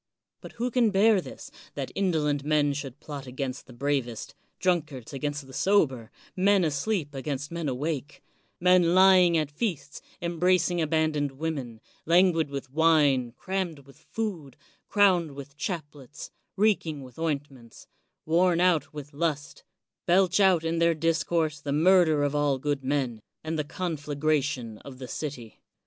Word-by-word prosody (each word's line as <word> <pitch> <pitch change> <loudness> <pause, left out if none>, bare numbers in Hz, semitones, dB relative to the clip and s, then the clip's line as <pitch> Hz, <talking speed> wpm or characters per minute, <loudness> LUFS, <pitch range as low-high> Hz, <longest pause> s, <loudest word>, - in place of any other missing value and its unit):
But - - -11
who 245 +2 -2
can 235 -2 +3
bear 205 0 +4
this, - - -10 0.2
that - - -4
indolent 155 -7 0
men 150 -1 +2
should 140 -3 -6
plot 140 -3 -8
against 130 0 -5
the - - -13
bravest, 125 -2 -3
— - - -46
drunkards 155 -9 -1
against 145 0 -3
the 135 - -14
sober, 130 - +1 0.2
— - - -26
^men 195 -1 +3
asleep 155 +1 -1
against 140 +1 -4
men 170 -3 -3
awake, 145 +2 -4 0.2
— - - -43
^men 180 -1 +4
ly 190 0 +7
ing 175 -2 +4
at 155 -2 -1
feasts, 145 - -4 0.2
embracing 175 0 +1
abandoned 155 -3 0
women, 135 -6 -5 0.3
lan 180 +3 +5
guid 160 -3 -1
with 140 -2 -6
wine, 145 -6 +3
crammed 180 -7 -4
with 140 +1 -18
food, 175 - -4 0.3
crowned 185 -7 +3
with 140 0 -10
chaplets, 145 -5 -6 0.3
reeking 180 -9 +1
with 125 +1 -13
ointments, 140 -7 -5 0.4
worn 170 +2 +3
out 175 -3 +2
with 145 -1 -9
lust, 145 -1 -3 0.4
belch 185 +2 +3
out 190 -4 +4
in 165 0 -1
their 170 0 +3
discourse 160 -1 0
the 140 - -4
murder 160 -1 +4
of 145 0 0
all 145 -2 +1
good 145 0 -2
men, 130 -5 -1 0.2
and 160 0 -3
the - - 0
conflagration 145 -7 -2
of 135 -2 -11
the 130 -1 -8
city? 125 -6 -7
150 Hz, 155 wpm, -27 LUFS, 140-175 Hz, 0.4 s, ly